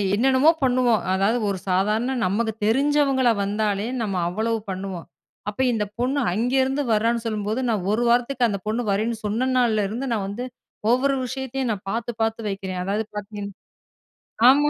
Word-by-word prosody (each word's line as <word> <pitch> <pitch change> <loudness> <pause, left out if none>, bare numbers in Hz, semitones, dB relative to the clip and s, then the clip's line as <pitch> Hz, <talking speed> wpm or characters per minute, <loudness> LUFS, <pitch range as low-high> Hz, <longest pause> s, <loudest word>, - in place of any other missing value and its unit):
என்னென்னமோ 260 +6 +4
பண்ணுவோம். 250 -3 +3
அதாவது, 200 +5 +2
ஒரு 195 - -1
சாதாரண 210 +8 +1
நமக்கு 220 +4 0
தெரிஞ்சவங்களா 270 +1 +3
வந்தாலே, 205 +1 -1
நம்ம 205 -4 -2
அவ்வளவு 220 +5 -1
பண்ணுவோம். 190 -2 -5 0.4
அப்போ, 210 +5 -3
இந்த 215 -2 0
பொண்ணு 260 +4 +1
அங்கேருந்து 260 +6 +1
வர்றான்னு 230 +2 +1
சொல்லும்போது, 215 +1 -2
நான் 210 -5 0
1 235 +3 +1
வாரத்துக்கு, 245 +1 +2
அந்த 200 -2 -2
பொண்ணு 220 +3 0
வரேன்னு 220 +4 0
சொன்ன 230 +5 0
நாள்ல 220 -4 +2
இருந்து, 245 +6 -3
நான் 210 -4 -1
வந்து 215 +6 -4 0.5
ஒவ்வொரு 275 +3 +3
விஷயத்தையும் 265 -1 -3
நான் 200 -3 -5
பாத்து 235 +2 -2
பாத்து 225 0 -1
வைக்கிறேன். 190 -2 -4
அதாவது, 205 +4 -1
பாத்தீங்கன்னா 205 -1 -6 0.9
ஆமா. 290 +3 +5
225 Hz, 150 wpm, -23 LUFS, 205-255 Hz, 0.9 s, ஆமா